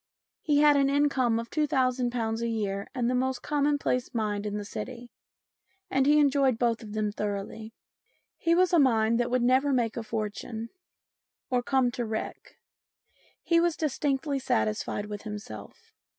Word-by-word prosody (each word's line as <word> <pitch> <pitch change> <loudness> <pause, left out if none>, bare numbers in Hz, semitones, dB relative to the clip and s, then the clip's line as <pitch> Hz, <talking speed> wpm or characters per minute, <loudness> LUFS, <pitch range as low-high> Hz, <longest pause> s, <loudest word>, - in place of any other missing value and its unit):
He 295 -2 +2
had 295 -1 +6
an 275 -1 +3
income 275 -5 +2
of 230 0 -7
.2000 250 -6 0
a 235 - -1
year 200 -3 -2
and 245 -2 0
the 250 - +1
most 260 +1 -1
commonplace 285 -4 0
mind 210 -2 -1
in 210 0 -3
the 205 - -5
City, 240 +4 -7 0.8
and 270 0 +2
he 300 +1 +5
enjoyed 275 -4 +3
both 235 -1 0
of 210 -2 -9
them 215 -1 -1
thoroughly. 210 +2 -5 0.6
His 335 0 +2
was 365 0 +3
a 340 - +6
mind 230 -4 +3
that 240 0 0
would 250 0 +1
never 260 +3 +3
make 235 -4 0
a 235 - -3
fortune 220 +1 -5 0.8
or 250 -1 +2
come 255 -1 +1
to 240 - -3
wreck. 220 -1 -5 0.9
He 335 -1 +3
was 340 -1 +1
distinctly 285 -1 -1
satisfied 110 - -1
with 210 -1 -6
himself. 220 - -9
245 Hz, 160 wpm, -28 LUFS, 220-280 Hz, 0.9 s, had